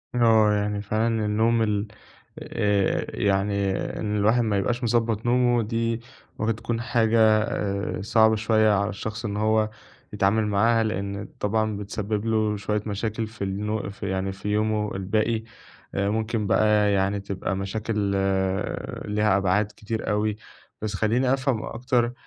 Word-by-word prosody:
آه 110 Hz, -3 st, +5 dB
يعني 105 Hz, 0 st, -1 dB
فعلًا 110 Hz, +1 st, 0 dB
النوم 110 Hz, +2 st, +2 dB
ال 105 Hz, -1 st, 0 dB, 0.5 s
آآ، 100 Hz, -2 st, 0 dB
يعني 100 Hz, 0 st, +1 dB, 0.3 s
إن 105 Hz, -1 st, -2 dB
الواحد 110 Hz, +4 st, +3 dB
ما 105 Hz, -3 st, +1 dB
يبقاش 120 Hz, +5 st, -1 dB
مضبَّط 115 Hz, -1 st, +1 dB
نومه 120 Hz, -1 st, +3 dB
دي 115 Hz, +1 st, -1 dB, 0.4 s
ممكن 110 Hz, +1 st, 0 dB
تكون 115 Hz, +1 st, -3 dB
حاجة 110 Hz, -2 st, +3 dB, 0.6 s
صعبة 110 Hz, +2 st, +4 dB
شوية 110 Hz, 0 st, +3 dB
على 100 Hz, 0 st, +1 dB
الشخص 110 Hz, +3 st, -5 dB
إن 105 Hz, -1 st, -3 dB
هو 110 Hz, 0 st, +2 dB, 0.4 s
يتعامل 105 Hz, +2 st, +2 dB
معاها، 115 Hz, +3 st, +3 dB
لأن 100 Hz, -1 st, -3 dB
طبعًا 110 Hz, 0 st, 0 dB
بتسبِّب 105 Hz, +1 st, -3 dB
له 110 Hz, -2 st, +1 dB
شوية 105 Hz, +1 st, -1 dB
مشاكل 110 Hz, +2 st, -2 dB
في 110 Hz, -1 st, -7 dB
النو 105 Hz, +2 st, -2 dB
في 100 Hz, 0 st, -6 dB
يعني 95 Hz, 0 st, -1 dB
في 100 Hz, +2 st, -6 dB
يومه 105 Hz, 0 st, 0 dB
الباقي، 110 Hz, +4 st, 0 dB, 0.5 s
ممكن 105 Hz, +2 st, -1 dB
بقى 105 Hz, -1 st, +3 dB
يعني 100 Hz, +1 st, +1 dB
تبقى 100 Hz, -1 st, -3 dB
مشاكل 105 Hz, +3 st, -3 dB, 1.1 s
ليها 105 Hz, -1 st, +2 dB
أبعاد 100 Hz, +2 st, +2 dB
كتير 110 Hz, +1 st, -4 dB
أوي. 105 Hz, 0 st, 0 dB, 0.5 s
بس 110 Hz, -1 st, -3 dB
خليني 120 Hz, +5 st, +2 dB
أفهم 130 Hz, -4 st, 0 dB
أكتر 120 Hz, 0 st, 0 dB
110 Hz, 135 wpm, -25 LUFS, 100-115 Hz, 1.1 s, آه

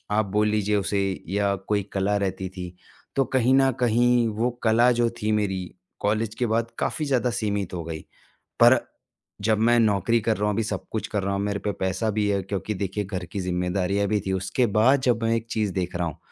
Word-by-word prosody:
आप 105 Hz, 0 st, +2 dB
बोल 105 Hz, +2 st, +1 dB
लीजिए 105 Hz, -1 st, +1 dB
उसे, 100 Hz, 0 st, 0 dB, 0.3 s
या 100 Hz, +1 st, +1 dB
कोई 105 Hz, -1 st, +1 dB
कला 100 Hz, +1 st, +1 dB
रहती 95 Hz, -1 st, -2 dB
थी, 90 Hz, -1 st, -8 dB, 0.4 s
तो 135 Hz, -, +3 dB
कहीं 130 Hz, +1 st, +4 dB
न 135 Hz, 0 st, +5 dB
कहीं 120 Hz, 0 st, +3 dB
वो 120 Hz, +3 st, +1 dB
कला 115 Hz, +2 st, +4 dB
जो 120 Hz, -, +3 dB
थी 110 Hz, -, +1 dB
मेरी, 95 Hz, -3 st, 0 dB, 0.4 s
कॉलेज 110 Hz, +1 st, 0 dB
के 125 Hz, -, -1 dB
बाद 115 Hz, 0 st, 0 dB
काफ़ी 155 Hz, -, -1 dB
ज़्यादा 125 Hz, -3 st, +1 dB
सीमित 100 Hz, -4 st, -2 dB
हो 85 Hz, -, -3 dB
गई। 80 Hz, -1 st, -5 dB, 0.6 s
पर -, -, +7 dB, 0.7 s
जब 110 Hz, -1 st, +3 dB
मैं 120 Hz, +2 st, +4 dB
नौकरी 110 Hz, +1 st, +2 dB
कर 110 Hz, +1 st, 0 dB
रहा 105 Hz, -, 0 dB
हूँ, 105 Hz, -, +1 dB
अभी 110 Hz, +2 st, 0 dB
सब 110 Hz, -, -4 dB
कुछ 110 Hz, -, -3 dB
कर 105 Hz, -3 st, -2 dB
रहा 100 Hz, +1 st, -1 dB
हूँ, 100 Hz, -, -1 dB
मेरे 100 Hz, 0 st, -1 dB
पे 105 Hz, -, -2 dB
पैसा 95 Hz, +4 st, 0 dB
भी 105 Hz, -1 st, +2 dB
है, 100 Hz, -1 st, +1 dB
क्योंकि 100 Hz, +2 st, -3 dB
देखिए, 100 Hz, +2 st, -2 dB
घर 95 Hz, -2 st, -5 dB
की 100 Hz, -, -6 dB
ज़िम्मेदारियाँ 90 Hz, +2 st, 0 dB
भी 105 Hz, +1 st, +1 dB
थीं। 95 Hz, -, -1 dB
उसके 95 Hz, +7 st, 0 dB
बाद 130 Hz, +5 st, +5 dB
जब 115 Hz, -1 st, +1 dB
मैं 115 Hz, 0 st, +2 dB
एक 115 Hz, 0 st, -3 dB
चीज़ 105 Hz, -3 st, 0 dB
देख 90 Hz, -1 st, -3 dB
रहा 85 Hz, -1 st, 0 dB
हूँ, 80 Hz, -, -6 dB
105 Hz, 220 wpm, -25 LUFS, 95-115 Hz, 0.7 s, पर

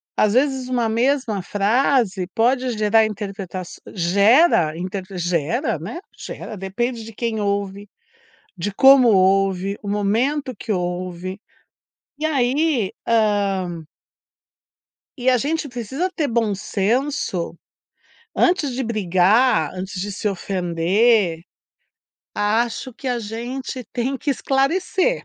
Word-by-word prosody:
às 210 Hz, 0 st, +2 dB
vezes 260 Hz, -1 st, +1 dB
uma 240 Hz, -3 st, +1 dB
mesma 235 Hz, -3 st, 0 dB
frase 205 Hz, -1 st, +1 dB
pode 250 Hz, +2 st, +2 dB
gerar 215 Hz, +1 st, +4 dB
interpretação 195 Hz, -3 st, -6 dB
gera 200 Hz, -, +4 dB
interpre 185 Hz, +1 st, -5 dB
gera, 170 Hz, -3 st, -1 dB
né, 215 Hz, -, -6 dB, 0.2 s
gera. 215 Hz, -, -7 dB
Depende 225 Hz, +5 st, -3 dB
de 225 Hz, -, -9 dB
quem 225 Hz, -1 st, -2 dB
ouve, 200 Hz, 0 st, -2 dB, 0.7 s
de 200 Hz, +4 st, -2 dB
como 265 Hz, +1 st, +7 dB
ouve, 195 Hz, 0 st, +2 dB
o 205 Hz, -, -9 dB
momento 245 Hz, +7 st, 0 dB
que 215 Hz, -, -5 dB
ouve 180 Hz, +1 st, -4 dB, 0.8 s
e 315 Hz, -, 0 dB
aí, 270 Hz, -4 st, +1 dB
hã 200 Hz, -6 st, +1 dB, 1.3 s
E 255 Hz, +1 st, +2 dB
a 250 Hz, -, +4 dB
gente 300 Hz, +4 st, -1 dB
precisa 260 Hz, -, -3 dB
ter 300 Hz, -4 st, 0 dB
bom 225 Hz, -4 st, 0 dB
senso, 210 Hz, -, -1 dB, 0.8 s
antes 335 Hz, -7 st, +2 dB
de 260 Hz, +1 st, -2 dB
brigar, 205 Hz, -, +2 dB
antes 185 Hz, 0 st, -6 dB
de 205 Hz, +1 st, -4 dB
se 205 Hz, +2 st, -3 dB
ofender, 185 Hz, 0 st, +1 dB, 0.9 s
acho 230 Hz, +4 st, 0 dB
que 260 Hz, +3 st, -6 dB
a 245 Hz, -1 st, 0 dB
gente 245 Hz, +4 st, -5 dB
tem 255 Hz, +2 st, -1 dB
que 285 Hz, -, -2 dB
esclarecer. 360 Hz, -, 0 dB
215 Hz, 115 wpm, -21 LUFS, 190-255 Hz, 1.3 s, como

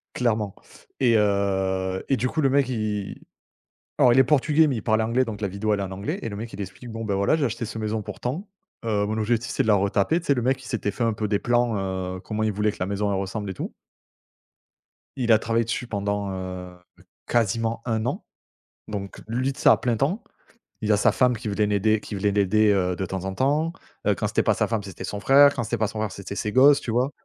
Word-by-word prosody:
clairement 110 Hz, -5 st, 0 dB, 0.5 s
et 120 Hz, -3 st, +4 dB
heu, 95 Hz, -2 st, 0 dB
et 135 Hz, -, +2 dB
du 125 Hz, +3 st, 0 dB
coup 160 Hz, -, -3 dB
le 135 Hz, -, +3 dB
mec 135 Hz, -1 st, +2 dB
il 105 Hz, -4 st, -3 dB, 0.8 s
alors 125 Hz, -, +6 dB
il 130 Hz, -, +5 dB
est -, -, +8 dB
portugais 150 Hz, +3 st, +3 dB
mais 135 Hz, -5 st, -1 dB
il -, -, -4 dB
parle 110 Hz, +1 st, +2 dB
anglais 115 Hz, +4 st, +1 dB
donc 110 Hz, -3 st, -6 dB
la 100 Hz, -, -1 dB
vidéo 100 Hz, +3 st, -1 dB
elle 100 Hz, -, -1 dB
est -, -, -1 dB
en 95 Hz, -, -5 dB
anglais, 100 Hz, +2 st, -4 dB
et 115 Hz, -, -4 dB
le 100 Hz, -, -6 dB
mec 115 Hz, +2 st, -7 dB
il -, -, -6 dB
explique 95 Hz, +6 st, -8 dB
bon, 115 Hz, 0 st, -5 dB
bah, 105 Hz, -3 st, -1 dB
voilà 100 Hz, +9 st, +2 dB
j'ai 160 Hz, -, -1 dB
acheté 115 Hz, -1 st, -3 dB
cette 110 Hz, +1 st, -6 dB
maison 110 Hz, 0 st, -1 dB
pour -, -, -8 dB
tant, 155 Hz, -, -3 dB, 0.4 s
heu, 105 Hz, -2 st, +1 dB
mon 110 Hz, +1 st, -2 dB
objectif 115 Hz, +2 st, 0 dB
c'est -, -, +1 dB
de -, -, -4 dB
la 105 Hz, -, +5 dB
retaper. 100 Hz, -, +1 dB
Tu -, -, -13 dB
sais, 140 Hz, -, +5 dB
le 125 Hz, -, -1 dB
mec 130 Hz, +2 st, 0 dB
il -, -, -10 dB
s'était 105 Hz, -3 st, -1 dB
fait 120 Hz, -, -3 dB
un 115 Hz, -, +2 dB
peu 105 Hz, 0 st, -2 dB
des 100 Hz, -1 st, +1 dB
plans, 120 Hz, -1 st, +1 dB, 0.4 s
heu 95 Hz, -, -8 dB
comment 110 Hz, +2 st, -3 dB
il 110 Hz, -, +1 dB
voulait 105 Hz, +1 st, +1 dB
que -, -, -13 dB
la 90 Hz, -, 0 dB
maison 100 Hz, +1 st, -1 dB
elle 95 Hz, -, 0 dB
ressemble 100 Hz, +1 st, -4 dB
et -, -, -3 dB
tout -, -, -6 dB, 1.4 s
il 120 Hz, -3 st, +1 dB
a 110 Hz, -, +6 dB
travaillé 115 Hz, +1 st, +1 dB
dessus 120 Hz, +2 st, -3 dB
pendant, 100 Hz, -1 st, -2 dB
heu, 90 Hz, -1 st, -6 dB, 0.5 s
quasiment 115 Hz, 0 st, 0 dB
1 110 Hz, -2 st, -1 dB
an, 125 Hz, -, -3 dB, 0.6 s
donc 100 Hz, -2 st, -6 dB
lui, 130 Hz, +4 st, 0 dB
tu -, -, -11 dB
sais, -, -, +5 dB
à -, -, +8 dB
plein 120 Hz, -2 st, 0 dB
temps. 155 Hz, -, 0 dB, 0.6 s
Il 110 Hz, -1 st, +1 dB
a 105 Hz, -, +4 dB
sa 110 Hz, -, +4 dB
femme 125 Hz, +3 st, +2 dB
qui 115 Hz, 0 st, -7 dB
venait 105 Hz, 0 st, +1 dB
l'aider 105 Hz, +1 st, +2 dB
qui 105 Hz, -, -7 dB
venait 100 Hz, +1 st, +1 dB
l'aider, 105 Hz, +1 st, +3 dB
heu, 90 Hz, -2 st, +1 dB
de 95 Hz, -, -3 dB
temps 95 Hz, 0 st, -4 dB
en 95 Hz, -, -3 dB
temps, 150 Hz, -, +1 dB, 0.3 s
heu, -, -, +4 dB
quand -, -, -1 dB
c'était -, -, +1 dB
pas -, -, +3 dB
sa -, -, +1 dB
femme 115 Hz, -2 st, -1 dB
c'était 95 Hz, -3 st, -8 dB
son 105 Hz, -, -4 dB
frère, 140 Hz, +6 st, +6 dB
quand 120 Hz, -, -2 dB
c'était 110 Hz, -, -2 dB
pas 110 Hz, -, +1 dB
son 110 Hz, +1 st, -6 dB
frère 110 Hz, -2 st, -2 dB
c'était 100 Hz, +1 st, -7 dB
ses 105 Hz, 0 st, -2 dB
gosses, 140 Hz, +3 st, +7 dB
tu -, -, -6 dB
vois? 125 Hz, +4 st, +1 dB
110 Hz, 260 wpm, -24 LUFS, 100-120 Hz, 1.4 s, est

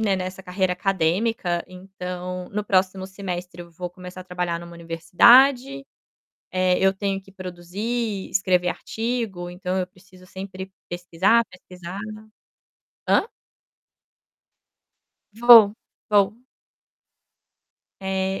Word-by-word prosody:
né, 200 Hz, -3 st, +2 dB
nessa 185 Hz, +1 st, -5 dB
carreira 185 Hz, 0 st, 0 dB
acadêmica, 180 Hz, 0 st, 0 dB
então, 180 Hz, -1 st, -7 dB
no 210 Hz, +1 st, -3 dB
próximo 190 Hz, -1 st, +1 dB
semestre 180 Hz, -2 st, -6 dB
eu 170 Hz, -, -15 dB
vou 180 Hz, +1 st, -6 dB
começar 180 Hz, 0 st, -10 dB
a -, -, -10 dB
trabalhar 180 Hz, -2 st, -3 dB
em -, -, -9 dB
uma 170 Hz, -, -12 dB
universidade, 245 Hz, -, +4 dB, 0.7 s
eh, 185 Hz, -1 st, +2 dB
eu 190 Hz, 0 st, +4 dB
tenho 195 Hz, 0 st, -2 dB
que 195 Hz, -, -18 dB
produzir, 195 Hz, +4 st, -4 dB
escrever 185 Hz, -2 st, +2 dB
artigo, 220 Hz, -5 st, -3 dB
então, 180 Hz, +1 st, -3 dB
eu 185 Hz, -, -1 dB
preciso 185 Hz, 0 st, -19 dB
sempre 190 Hz, 0 st, -8 dB, 0.2 s
pesquisar, 175 Hz, +6 st, +2 dB
pesquisar 180 Hz, 0 st, -10 dB, 1.1 s
Hã? -, -, +4 dB, 2.1 s
Vou, 225 Hz, -2 st, +8 dB, 0.4 s
vou. 210 Hz, +4 st, +2 dB, 1.6 s
É. 190 Hz, 0 st, -1 dB
185 Hz, 110 wpm, -23 LUFS, 180-200 Hz, 2.1 s, Vou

